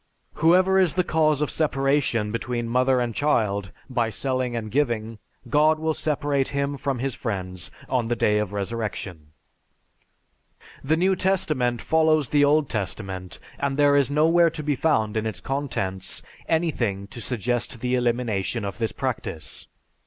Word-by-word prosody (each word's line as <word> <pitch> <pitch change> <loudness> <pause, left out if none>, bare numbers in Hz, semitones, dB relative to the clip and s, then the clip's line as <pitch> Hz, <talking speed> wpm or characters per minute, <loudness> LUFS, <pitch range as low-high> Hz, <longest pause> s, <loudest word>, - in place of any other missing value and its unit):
Whoever 185 +3 +5
is 180 -5 +3
the 180 - +3
cause 155 -3 +2
of 150 - -2
separation 135 -7 +1
between 120 +1 -2
mother 130 +2 +2
and 120 -1 -1
child 105 -9 0 0.2
by 120 -4 0
selling 130 +2 -2
and 110 -2 -4
giving, 115 -5 -1 0.3
God 155 +5 +4
will 160 0 0
separate 145 -3 0
him 140 0 -1
from 135 -1 -2
his 135 +1 -2
friends 95 -6 -4 0.2
on 125 -3 0
the 120 - 0
day 105 -2 +2
of 105 -2 -2
resurrection." 100 -7 -4 1.5
The 155 +4 +2
New 190 +3 +3
Testament 150 - 0
follows 155 -3 +3
the 145 -1 +4
Old 145 0 +4
Testament, 95 -4 -4 0.2
and 140 -1 -1
there 145 -1 +5
is 140 -1 +3
nowhere 165 +4 +4
to 155 -1 -7
be 145 0 +1
found 110 -7 +1
in 110 0 0
its 105 -5 -5
contents 110 -9 -3 0.3
anything 125 - 0
to 120 - -9
suggest 120 0 -2
the 125 +1 -1
elimination 120 -3 0
of 100 +2 -5
this 115 -1 0
practice. 105 - -4
125 Hz, 155 wpm, -24 LUFS, 110-150 Hz, 1.5 s, Whoever